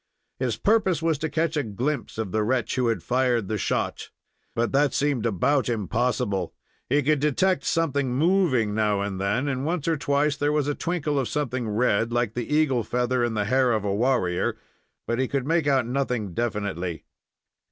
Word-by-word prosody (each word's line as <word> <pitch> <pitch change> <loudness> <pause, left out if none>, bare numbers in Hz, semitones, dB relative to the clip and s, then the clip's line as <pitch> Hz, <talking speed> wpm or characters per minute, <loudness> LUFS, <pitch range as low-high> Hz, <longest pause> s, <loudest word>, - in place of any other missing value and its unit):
His 125 -4 -1
purpose 195 -6 +2
was 160 -3 +1
to 160 - -2
catch 160 +2 0
a 150 - +2
glimpse 130 +6 -3
of 110 -4 -3
the 110 - +1
wretch 125 +2 0
who 125 -2 +1
had 115 - -1
fired 125 -4 +1
the 110 0 -2
shot. - - -2 0.5
But 115 0 0
that 140 -1 +2
seemed 140 -5 +1
about 125 +7 +1
impossible. 110 -3 -1 0.3
He 145 +2 +3
could 150 +1 +2
detect 160 +6 +1
something 140 -5 0
moving 140 - +2
now 105 -2 +1
and 100 -2 -3
then, 120 +8 0
and 130 -1 -2
once 165 0 -2
or 165 -1 +2
twice 145 +1 +1
there 145 +1 0
was 150 -2 +1
a 145 - +1
twinkle 150 -3 -1
of 130 - -1
something 130 -6 -2
red, 115 +1 +1
like 120 -2 0
the 120 +4 -4
eagle 150 -5 +2
feather 125 +2 0
in 120 -2 -1
the 105 -1 0
hair 130 +2 +3
of 110 -2 0
the 100 - -1
warrior, 100 -5 +1 0.5
but 115 +1 -1
he 130 - +1
could 135 -1 -2
make 165 0 +1
out 135 -3 +3
nothing 125 -6 -2
definitely. 95 -7 -3
125 Hz, 190 wpm, -25 LUFS, 110-145 Hz, 0.5 s, He